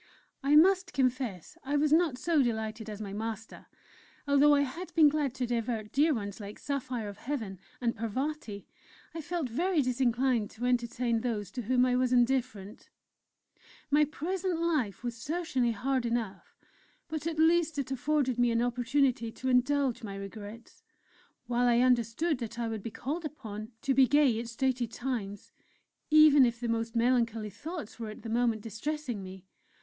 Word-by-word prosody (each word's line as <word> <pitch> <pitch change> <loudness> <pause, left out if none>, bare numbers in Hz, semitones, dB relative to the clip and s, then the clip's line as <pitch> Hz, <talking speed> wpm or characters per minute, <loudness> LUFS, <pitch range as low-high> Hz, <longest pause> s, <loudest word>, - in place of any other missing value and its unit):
I 285 +1 +3
must 370 +3 +5
confess 255 - -1
I 285 +2 0
was 300 +1 +2
not 320 -6 +3
so 320 +1 +2
delighted 220 -2 -2
as 210 -1 -7
my 195 -1 -6
master. 220 +1 -6 0.6
Although 285 +1 +5
I 285 - +3
had 285 +7 -4
been 310 -3 +7
glad 285 -4 -1
to 255 - -1
divert 230 -2 -2
dear 300 +4 +3
ones 205 -6 -3
like 205 0 -8
Saphire 260 -5 -3
of 200 -1 -8
Heaven 225 -9 -4 0.2
and 235 -2 0
Parvati, 230 -1 -4 0.5
I 325 - -5
felt 335 -2 -3
very 335 +8 0
disinclined 250 -2 +1
to 240 +3 -6
entertain 240 -1 0
those 210 -5 -3
to 245 - -4
whom 250 +2 +2
I 250 -1 +2
was 255 0 +1
indifferent. 245 -5 0 1.0
My 295 +1 +5
present 350 +4 -2
life 295 - -1
was 240 -1 -3
certainly 265 -2 -1
hard 255 +2 -1
enough, 225 -5 -4 0.5
but 315 -1 -4
at 325 -1 -3
least 320 -1 +3
it 270 -2 -3
afforded 265 -1 0
me 245 0 +4
an 230 0 +1
opportunity 245 0 +1
to 260 - -3
indulge 260 0 +2
my 200 -3 -6
regrets; 205 +3 -9 0.6
while 245 0 +1
I 240 -1 +4
understood 250 +5 +2
that 230 -1 -6
I 235 -1 -2
would 220 -2 -4
be 230 - -5
called 295 +9 -4
upon 220 -7 -7
to 275 -2 +2
be 265 0 +5
gay 280 -6 +3
at 235 - -5
stated 245 0 -1
times, 230 -6 -4 0.6
even 305 -2 +7
if 235 -1 +1
the 240 - -3
most 230 0 -2
melancholy 230 -3 +1
thoughts 315 - -7
were 225 -2 -5
at 215 - -10
the 230 - -6
moment 230 -2 +1
distressing 240 +1 -4
me. 185 0 -10
245 Hz, 170 wpm, -30 LUFS, 225-290 Hz, 1.0 s, been